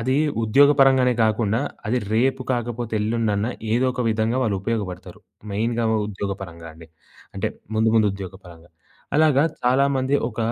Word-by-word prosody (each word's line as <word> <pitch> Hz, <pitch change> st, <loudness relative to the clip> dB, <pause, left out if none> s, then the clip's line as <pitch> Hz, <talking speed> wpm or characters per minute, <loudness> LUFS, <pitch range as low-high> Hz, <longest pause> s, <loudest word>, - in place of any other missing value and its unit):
అది 130 Hz, +3 st, 0 dB, 0.3 s
ఉద్యోగపరంగానే 135 Hz, +1 st, +5 dB
గాకుంన్నా 110 Hz, 0 st, +1 dB, 0.3 s
అది 125 Hz, +3 st, +1 dB, 0.2 s
రేపు 130 Hz, +3 st, +1 dB
కాకపోతే, 120 Hz, -1 st, -3 dB
ఎల్లుండన్న 105 Hz, -1 st, 0 dB, 0.3 s
ఏదో 120 Hz, +3 st, +2 dB
ఒక 125 Hz, -, -5 dB
విధంగా 110 Hz, +2 st, 0 dB
వాళ్ళు 105 Hz, -4 st, 0 dB
ఉపయోగబడతారు. 100 Hz, -5 st, -4 dB, 0.3 s
మెయిన్‌గా 115 Hz, +3 st, -1 dB, 0.2 s
ఉద్యోగపరంగా 95 Hz, -4 st, -6 dB
అండి. 80 Hz, +1 st, -14 dB, 0.5 s
అంటే 100 Hz, +3 st, -1 dB, 0.3 s
ముందు, 110 Hz, +1 st, +2 dB
ముందు 110 Hz, -2 st, +4 dB
ఉద్యోగపరంగా. 90 Hz, -3 st, -10 dB, 0.5 s
అలాగా 150 Hz, -3 st, +4 dB, 0.2 s
చాలామంది 135 Hz, +1 st, +2 dB
ఒక 110 Hz, -, -13 dB
115 Hz, 125 wpm, -22 LUFS, 100-125 Hz, 0.5 s, ఉద్యోగపరంగానే